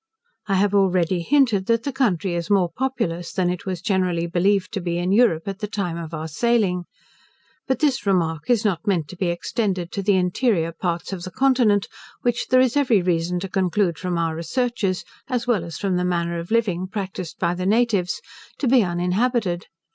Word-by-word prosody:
I 195 Hz, -, +1 dB
have 200 Hz, +1 st, +2 dB
already 185 Hz, -3 st, +2 dB
hinted, 230 Hz, -4 st, +2 dB
that 230 Hz, 0 st, +2 dB
the 280 Hz, -, -2 dB
country 200 Hz, -, +1 dB
is 170 Hz, 0 st, -3 dB
more 190 Hz, -4 st, +3 dB
populous 225 Hz, -11 st, -2 dB
than 180 Hz, -1 st, 0 dB
it 180 Hz, +1 st, -6 dB
was 180 Hz, -2 st, -3 dB
generally 185 Hz, -4 st, +1 dB
believed 185 Hz, +3 st, +1 dB
to 195 Hz, -, -2 dB
be 170 Hz, -1 st, -2 dB
in 175 Hz, +2 st, 0 dB
Europe 200 Hz, -7 st, +3 dB
at 195 Hz, 0 st, -4 dB
the 210 Hz, -, -3 dB
time 195 Hz, -5 st, -3 dB
of 165 Hz, -1 st, -6 dB
our 160 Hz, -1 st, -4 dB
sailing. 185 Hz, 0 st, +1 dB, 0.8 s
But 265 Hz, -2 st, +1 dB
this 275 Hz, -8 st, +1 dB
remark 165 Hz, -4 st, 0 dB
is 235 Hz, -2 st, +3 dB
not 185 Hz, -4 st, -1 dB
meant 175 Hz, -7 st, +1 dB
to -, -, -8 dB
be 185 Hz, 0 st, -1 dB
extended 185 Hz, 0 st, -2 dB
to 200 Hz, -, -3 dB
the 200 Hz, 0 st, +3 dB
interior 180 Hz, -1 st, +1 dB
parts 170 Hz, +2 st, -3 dB
of 185 Hz, -, -5 dB
the 185 Hz, -, -6 dB
continent, 245 Hz, -4 st, +2 dB, 0.4 s
which 240 Hz, -1 st, 0 dB
there 255 Hz, -1 st, +5 dB
is 255 Hz, 0 st, +2 dB
every 245 Hz, -9 st, +3 dB
reason 175 Hz, 0 st, 0 dB
to 195 Hz, -, -3 dB
conclude 185 Hz, -2 st, 0 dB
from 180 Hz, -2 st, -2 dB
our 165 Hz, -1 st, 0 dB
researches, 195 Hz, +1 st, -1 dB, 0.2 s
as 245 Hz, -3 st, -1 dB
well 230 Hz, -8 st, +1 dB
as 170 Hz, -1 st, -7 dB
from 195 Hz, -3 st, 0 dB
the 180 Hz, -, 0 dB
manner 170 Hz, -1 st, -1 dB
of 170 Hz, -, -7 dB
living 195 Hz, -6 st, +1 dB
practised 190 Hz, -3 st, -5 dB
by 170 Hz, -, 0 dB
the 180 Hz, +1 st, -3 dB
natives, 210 Hz, -4 st, +1 dB, 0.4 s
to 275 Hz, -, -1 dB
be 250 Hz, 0 st, +5 dB
uninhabited. 180 Hz, +2 st, 0 dB
190 Hz, 200 wpm, -22 LUFS, 175-225 Hz, 0.8 s, there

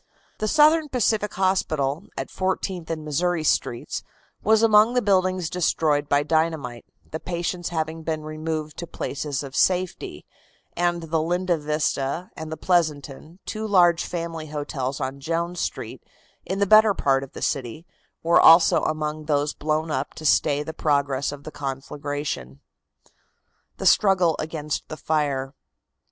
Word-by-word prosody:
The 215 Hz, -, -1 dB
Southern 310 Hz, +3 st, +4 dB
Pacific 220 Hz, -5 st, +1 dB
Hospital, 170 Hz, -4 st, 0 dB
at -, -, -4 dB
Fourteenth 185 Hz, -2 st, -2 dB
and 155 Hz, -2 st, -4 dB
Missouri 170 Hz, +2 st, 0 dB
Streets, 120 Hz, -5 st, -1 dB, 0.4 s
was 220 Hz, +1 st, +3 dB
among 220 Hz, +2 st, +5 dB
the 250 Hz, -, +3 dB
buildings 185 Hz, -3 st, +2 dB
destroyed 155 Hz, -4 st, 0 dB
by 145 Hz, 0 st, +3 dB
dynamite, 155 Hz, -6 st, -1 dB, 0.3 s
the 160 Hz, -, -4 dB
patients 175 Hz, 0 st, -3 dB
having 160 Hz, -1 st, -3 dB
been 160 Hz, -1 st, -3 dB
removed 155 Hz, 0 st, -4 dB
to 170 Hz, -, -6 dB
places 145 Hz, -3 st, -4 dB
of 135 Hz, 0 st, -8 dB
safety, 185 Hz, 0 st, 0 dB, 0.5 s
and 175 Hz, -1 st, 0 dB
the 160 Hz, 0 st, 0 dB
Linda 175 Hz, +2 st, 0 dB
Vista 150 Hz, +1 st, -2 dB
and 160 Hz, 0 st, -7 dB
the 160 Hz, -, -4 dB
Pleasanton, 155 Hz, -2 st, -1 dB
two 220 Hz, 0 st, -4 dB
large 175 Hz, -4 st, +4 dB
family 165 Hz, -2 st, -5 dB
hotels 145 Hz, -3 st, -4 dB
on 135 Hz, +1 st, -4 dB
Jones 170 Hz, +4 st, -2 dB
Street, -, -, -4 dB, 0.5 s
in 190 Hz, -, -2 dB
the 200 Hz, -, +2 dB
better 215 Hz, 0 st, +6 dB
part 135 Hz, -1 st, +1 dB
of 135 Hz, -, -11 dB
the -, -, -8 dB
city, 135 Hz, +4 st, -3 dB, 0.4 s
were 170 Hz, +1 st, +5 dB
also 165 Hz, +1 st, +7 dB
among 155 Hz, 0 st, -2 dB
those 145 Hz, -1 st, 0 dB
blown 155 Hz, +1 st, -1 dB
up 135 Hz, 0 st, -3 dB
to 155 Hz, -, -9 dB
stay 145 Hz, 0 st, +3 dB
the 160 Hz, -, -6 dB
progress 140 Hz, -3 st, 0 dB
of 145 Hz, -1 st, -9 dB
the 155 Hz, -, -8 dB
conflagration. 140 Hz, -, -5 dB, 1.2 s
THE -, -, -5 dB
STRUGGLE 185 Hz, -5 st, +4 dB
AGAINST 155 Hz, -1 st, -4 dB
THE 155 Hz, -, -7 dB
FIRE. 140 Hz, -4 st, -1 dB
160 Hz, 145 wpm, -24 LUFS, 145-180 Hz, 1.2 s, also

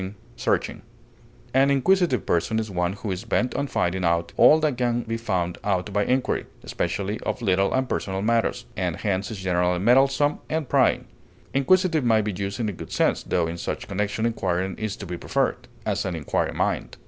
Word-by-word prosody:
intrusive, 95 Hz, +2 st, -3 dB, 0.7 s
An 135 Hz, +2 st, +4 dB
inquisitive 165 Hz, +1 st, +2 dB
person 85 Hz, +6 st, +1 dB
is 110 Hz, -2 st, -2 dB
one 90 Hz, 0 st, 0 dB
who 100 Hz, 0 st, -5 dB
is 90 Hz, 0 st, -4 dB
bent 125 Hz, -, 0 dB
on 140 Hz, -, -1 dB
finding 95 Hz, -6 st, -1 dB
out 85 Hz, 0 st, +1 dB
all 155 Hz, -, +7 dB
that 155 Hz, -4 st, +1 dB
can 120 Hz, -1 st, 0 dB
be 115 Hz, 0 st, -3 dB
found 90 Hz, -7 st, -2 dB
out 100 Hz, 0 st, -1 dB
by 100 Hz, 0 st, +2 dB
inquiry, 130 Hz, +3 st, 0 dB, 0.2 s
especially 100 Hz, +3 st, -2 dB
of -, -, -3 dB
little 95 Hz, -1 st, +2 dB
and 130 Hz, 0 st, +1 dB
personal 95 Hz, -5 st, -2 dB
matters, 115 Hz, +1 st, +1 dB
and -, -, -1 dB
hence 100 Hz, -1 st, -2 dB
is 110 Hz, -, -5 dB
generally 90 Hz, -1 st, +1 dB
meddlesome 135 Hz, +8 st, +3 dB
and 160 Hz, -3 st, -1 dB
prying. -, -, +3 dB, 0.5 s
Inquisitive 165 Hz, +3 st, +3 dB
may 115 Hz, -2 st, +4 dB
be 105 Hz, -, -1 dB
used 100 Hz, +2 st, -4 dB
in 115 Hz, -, 0 dB
a -, -, -1 dB
good 90 Hz, -, -9 dB
sense, -, -, +1 dB
tho 85 Hz, -2 st, 0 dB
in 85 Hz, +1 st, -5 dB
such -, -, -4 dB
connection 105 Hz, +3 st, -1 dB
inquiring 95 Hz, -4 st, -1 dB
is 110 Hz, -2 st, -2 dB
to 100 Hz, -, -8 dB
be 90 Hz, -1 st, -5 dB
preferred; -, -, -1 dB, 0.2 s
as, -, -, 0 dB
an 90 Hz, -, -3 dB
inquiring 75 Hz, -4 st, -1 dB
mind. -, -, -1 dB
105 Hz, 190 wpm, -24 LUFS, 95-125 Hz, 0.7 s, all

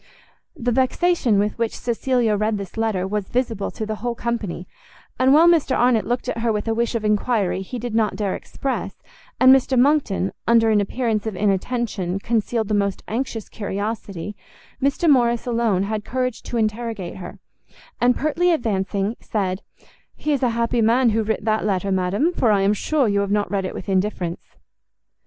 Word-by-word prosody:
The 245 Hz, +1 st, -1 dB
vexation 260 Hz, -, +2 dB
with 210 Hz, +3 st, 0 dB
which 230 Hz, -1 st, -1 dB
Cecilia 240 Hz, -2 st, 0 dB
read 215 Hz, +1 st, 0 dB
this 195 Hz, -2 st, -7 dB
letter 220 Hz, -5 st, 0 dB
was 205 Hz, -1 st, -3 dB
visible 235 Hz, -5 st, -1 dB
to 220 Hz, -, -5 dB
the 215 Hz, 0 st, -4 dB
whole 240 Hz, +1 st, -3 dB
company; 220 Hz, -7 st, -3 dB, 0.5 s
and 260 Hz, +1 st, +4 dB
while 315 Hz, +4 st, +7 dB
Mr 320 Hz, -6 st, +3 dB
Arnott 240 Hz, -3 st, +3 dB
looked 245 Hz, +1 st, -2 dB
at -, -, -2 dB
her 230 Hz, 0 st, +1 dB
with 210 Hz, +1 st, -2 dB
a 225 Hz, -, +1 dB
wish 235 Hz, +1 st, -1 dB
of 220 Hz, -2 st, -2 dB
enquiry 210 Hz, -2 st, +1 dB
he 220 Hz, +6 st, -6 dB
did 240 Hz, -1 st, -5 dB
not 220 Hz, -3 st, +1 dB
dare 200 Hz, -1 st, -1 dB
express, 270 Hz, -1 st, -5 dB, 0.4 s
and 260 Hz, +1 st, +8 dB
Mr 265 Hz, 0 st, +1 dB
Monckton, 250 Hz, -8 st, +2 dB
under 225 Hz, -1 st, +4 dB
an 210 Hz, -1 st, +4 dB
appearance 220 Hz, 0 st, -1 dB
of 215 Hz, -, -3 dB
inattention, 195 Hz, -1 st, -1 dB
concealed 225 Hz, +1 st, -1 dB
the 215 Hz, -, -1 dB
most 200 Hz, -2 st, 0 dB
anxious 225 Hz, -2 st, -3 dB
curiosity, 205 Hz, -2 st, -4 dB, 0.5 s
Mr 280 Hz, +5 st, +1 dB
Morrice 240 Hz, -5 st, +3 dB
alone 230 Hz, -6 st, +1 dB
had 210 Hz, +1 st, -3 dB
courage 255 Hz, 0 st, -2 dB
to 240 Hz, -, -4 dB
interrogate 215 Hz, -4 st, -2 dB
her; 185 Hz, -, -8 dB, 0.6 s
and, 245 Hz, 0 st, +4 dB
pertly 320 Hz, +4 st, +1 dB
advancing, 205 Hz, -, -1 dB
said, 190 Hz, -3 st, -2 dB, 0.5 s
"He 300 Hz, -, -1 dB
is 280 Hz, -, -1 dB
a 250 Hz, -, +3 dB
happy 235 Hz, 0 st, +1 dB
man 235 Hz, +2 st, +4 dB
who 225 Hz, +1 st, +1 dB
writ 220 Hz, -1 st, -2 dB
that 215 Hz, -1 st, +1 dB
letter, 195 Hz, -1 st, 0 dB
ma'am, 190 Hz, -, +1 dB
for 230 Hz, -, +3 dB
I 200 Hz, -2 st, +3 dB
am 200 Hz, +2 st, +3 dB
sure 275 Hz, +5 st, +1 dB
you 200 Hz, -1 st, +1 dB
have 200 Hz, 0 st, -1 dB
not 205 Hz, -2 st, 0 dB
read 195 Hz, -2 st, 0 dB
it -, -, -5 dB
with -, -, -7 dB
indifference." 185 Hz, -3 st, -1 dB
220 Hz, 185 wpm, -22 LUFS, 200-245 Hz, 0.6 s, and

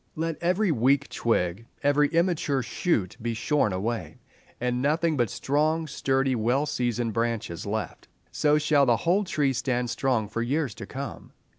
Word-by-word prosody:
Let 165 Hz, 0 st, -3 dB
every 180 Hz, +3 st, +2 dB
weak 140 Hz, +1 st, +2 dB
twig, 110 Hz, -1 st, -1 dB, 0.2 s
every 145 Hz, +1 st, +4 dB
immature 165 Hz, -4 st, +1 dB
shoot 115 Hz, -, -1 dB
be 115 Hz, 0 st, -2 dB
shorn 120 Hz, -1 st, +1 dB
away, 110 Hz, +5 st, -3 dB, 0.4 s
and 125 Hz, 0 st, -1 dB
nothing 155 Hz, +3 st, +1 dB
but 120 Hz, -5 st, +1 dB
strong, 155 Hz, +7 st, 0 dB
sturdy, 135 Hz, -2 st, 0 dB
well 120 Hz, +6 st, +1 dB
seasoned 120 Hz, -4 st, -1 dB
branches 115 Hz, -6 st, -2 dB
left. 110 Hz, 0 st, -4 dB, 0.2 s
So 150 Hz, 0 st, +3 dB
shall 150 Hz, -2 st, +3 dB
the 120 Hz, -2 st, +4 dB
whole 185 Hz, -, +1 dB
tree 145 Hz, -6 st, +1 dB
stand 125 Hz, 0 st, -1 dB
strong 125 Hz, -6 st, 0 dB
for 110 Hz, +3 st, -3 dB
years 135 Hz, +1 st, -1 dB
to -, -, -9 dB
come. -, -, -7 dB
135 Hz, 155 wpm, -26 LUFS, 115-150 Hz, 0.4 s, every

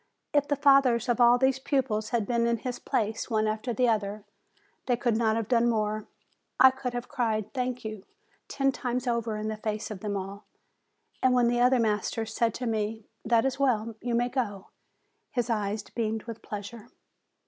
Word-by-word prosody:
If 290 Hz, -1 st, +3 dB
the 290 Hz, -, +1 dB
fathers 275 Hz, -4 st, +4 dB
of 240 Hz, 0 st, +1 dB
all 240 Hz, +1 st, +7 dB
these 265 Hz, +1 st, +2 dB
pupils 250 Hz, -6 st, 0 dB
had 230 Hz, -3 st, 0 dB
been 235 Hz, +1 st, +1 dB
in 235 Hz, 0 st, +1 dB
his 245 Hz, +2 st, -5 dB
place, 220 Hz, +3 st, -2 dB
one 220 Hz, -2 st, +1 dB
after 215 Hz, +3 st, -2 dB
the 245 Hz, +2 st, +2 dB
other, 210 Hz, -2 st, -1 dB, 0.6 s
they 245 Hz, -2 st, +2 dB
could 240 Hz, -2 st, +1 dB
not 220 Hz, -1 st, +2 dB
have 225 Hz, -2 st, -2 dB
done 240 Hz, -1 st, +3 dB
more. 215 Hz, -1 st, -1 dB, 0.5 s
I 260 Hz, -, +9 dB
could 260 Hz, -1 st, -5 dB
have 245 Hz, 0 st, -4 dB
cried 220 Hz, -6 st, -1 dB
'Thank 250 Hz, -2 st, -3 dB
you!" 215 Hz, -3 st, -6 dB, 0.4 s
ten 275 Hz, -1 st, +1 dB
times 250 Hz, -1 st, -3 dB
over, 235 Hz, -3 st, -1 dB
in 215 Hz, 0 st, -3 dB
the 220 Hz, 0 st, -3 dB
face 215 Hz, 0 st, -3 dB
of 205 Hz, -, -6 dB
them 205 Hz, 0 st, -3 dB
all. 195 Hz, +2 st, -6 dB, 0.8 s
And 255 Hz, -1 st, +4 dB
when 240 Hz, -1 st, +4 dB
the 240 Hz, 0 st, +1 dB
other 250 Hz, +1 st, +5 dB
masters 220 Hz, 0 st, -1 dB
said 230 Hz, -2 st, +1 dB
to 250 Hz, -, -4 dB
me, 220 Hz, -1 st, -2 dB, 0.2 s
'That 230 Hz, +1 st, +3 dB
is 270 Hz, 0 st, -1 dB
well; 230 Hz, -5 st, +1 dB
you 240 Hz, -1 st, -1 dB
may 240 Hz, +1 st, +1 dB
go," 205 Hz, -7 st, -3 dB, 0.6 s
his 245 Hz, -1 st, -1 dB
eyes 210 Hz, -1 st, -1 dB
beamed 220 Hz, -1 st, -3 dB
with 230 Hz, -1 st, -8 dB
pleasure. 210 Hz, +3 st, -8 dB
230 Hz, 190 wpm, -28 LUFS, 215-250 Hz, 0.8 s, I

